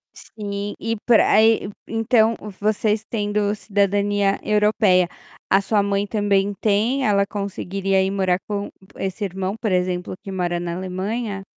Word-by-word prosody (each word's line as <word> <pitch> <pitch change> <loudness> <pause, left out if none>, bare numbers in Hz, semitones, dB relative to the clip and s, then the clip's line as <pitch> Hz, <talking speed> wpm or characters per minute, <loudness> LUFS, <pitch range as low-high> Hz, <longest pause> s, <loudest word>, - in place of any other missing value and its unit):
Sim, 205 -1 -6
e 225 +1 -2
pra 235 -3 +5
aí, 220 -1 +4 0.2
e - - -9
então 225 0 +3 0.3
vocês 215 +1 +1
tendo 205 -1 0
cidadania 200 -1 +1
europeia, 210 -4 +3 0.4
a 195 - +4
sua 205 +1 +1
mãe 200 0 0
também 205 -1 +1
tem? 225 +6 +1
Ela 200 -1 +3
conseguiria 195 -1 -1
ir 190 - -1
morar 190 -2 +1
com 205 -1 -3 0.3
esse 195 +2 -4
irmão, 190 +1 -3
por 215 -5 0
exemplo, 180 0 -1
que 195 - -7
mora 175 -2 -1
na 170 -1 -4
Alemanha? 195 +3 -3
200 Hz, 145 wpm, -22 LUFS, 195-210 Hz, 0.4 s, pra